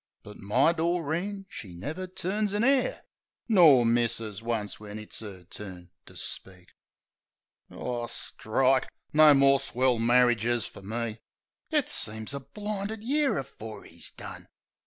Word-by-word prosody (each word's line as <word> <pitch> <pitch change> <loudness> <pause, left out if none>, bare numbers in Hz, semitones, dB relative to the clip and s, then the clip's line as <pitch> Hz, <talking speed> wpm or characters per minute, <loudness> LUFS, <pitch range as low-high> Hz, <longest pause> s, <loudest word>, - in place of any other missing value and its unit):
But 105 - -11
my 125 +11 +3
Doreen 170 +4 -1
she 95 - -9
never 155 - -5
turns 195 +3 -2
a 210 - +1
'air, 270 -1 +2 0.4
Nor 160 - +7
misses 115 -3 0
once 115 -3 -3
when 105 0 -8
it's 105 +1 -9
'er 100 -4 -9
turn 90 -1 -10 0.2
to - - -13
speak. 95 -2 -8 1.0
Ar, 120 -1 -4
strike! 130 +3 +1 0.2
No 155 -1 +8
more 135 0 +5
swell 130 -2 +1
marridges 120 -1 +3
fer - - -12
me! 110 +2 -4 0.5
It - - +2
seems 110 +3 +1
a 140 - -3
blinded 210 +6 -5
year 285 +3 +1
afore 110 -5 -7
'e's 85 0 -6
done. - - -10
125 Hz, 135 wpm, -28 LUFS, 110-170 Hz, 1.0 s, No